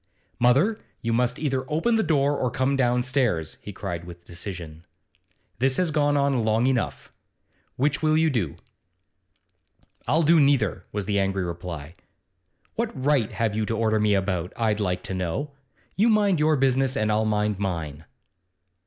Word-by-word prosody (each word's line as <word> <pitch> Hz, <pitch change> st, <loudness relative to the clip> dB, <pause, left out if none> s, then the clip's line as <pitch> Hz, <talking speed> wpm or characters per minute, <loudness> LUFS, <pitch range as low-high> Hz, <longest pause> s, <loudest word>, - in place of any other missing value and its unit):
'Mother, 140 Hz, -, +3 dB, 0.2 s
you 115 Hz, -1 st, 0 dB
must 125 Hz, +1 st, +1 dB
either 135 Hz, -4 st, -1 dB
open 165 Hz, +10 st, +1 dB
the 225 Hz, -, +3 dB
door 145 Hz, -5 st, +2 dB
or 125 Hz, -, 0 dB
come 130 Hz, +3 st, 0 dB
downstairs,' 125 Hz, -, +1 dB
he 105 Hz, -, -8 dB
cried 85 Hz, -4 st, -5 dB
with 85 Hz, 0 st, -12 dB
decision. 85 Hz, -3 st, -8 dB, 0.8 s
'This 130 Hz, +1 st, +2 dB
has 180 Hz, -3 st, +1 dB
gone 145 Hz, -1 st, +2 dB
on 140 Hz, -4 st, +1 dB
long 110 Hz, +2 st, +2 dB
enough. 130 Hz, -2 st, -1 dB, 0.6 s
Which 145 Hz, +3 st, 0 dB
will 155 Hz, 0 st, +3 dB
you 160 Hz, -1 st, +3 dB
do?' 100 Hz, -, -1 dB, 1.5 s
'I'll 155 Hz, +7 st, +3 dB
do 165 Hz, +2 st, +5 dB
neither,' 135 Hz, -, +2 dB
was 105 Hz, -1 st, -3 dB
the 100 Hz, 0 st, 0 dB
angry 95 Hz, -1 st, 0 dB
reply. 85 Hz, -3 st, -6 dB, 0.8 s
'What 230 Hz, 0 st, -1 dB
right 135 Hz, -4 st, +1 dB
have 110 Hz, -3 st, -1 dB
you 110 Hz, -, 0 dB
to 115 Hz, -, -1 dB
order 110 Hz, -1 st, +1 dB
me 105 Hz, -1 st, +3 dB
about, 95 Hz, -2 st, -1 dB
I'd 110 Hz, -2 st, 0 dB
like 90 Hz, -3 st, -1 dB
to -, -, -5 dB
know? 95 Hz, -, -3 dB, 0.4 s
You 220 Hz, +4 st, +3 dB
mind 205 Hz, -5 st, +3 dB
your 155 Hz, +1 st, +3 dB
business, 135 Hz, 0 st, +1 dB
and 110 Hz, -2 st, +1 dB
I'll 110 Hz, +1 st, +1 dB
mind 105 Hz, -2 st, 0 dB
mine. 80 Hz, -6 st, -4 dB
120 Hz, 160 wpm, -25 LUFS, 95-140 Hz, 1.5 s, do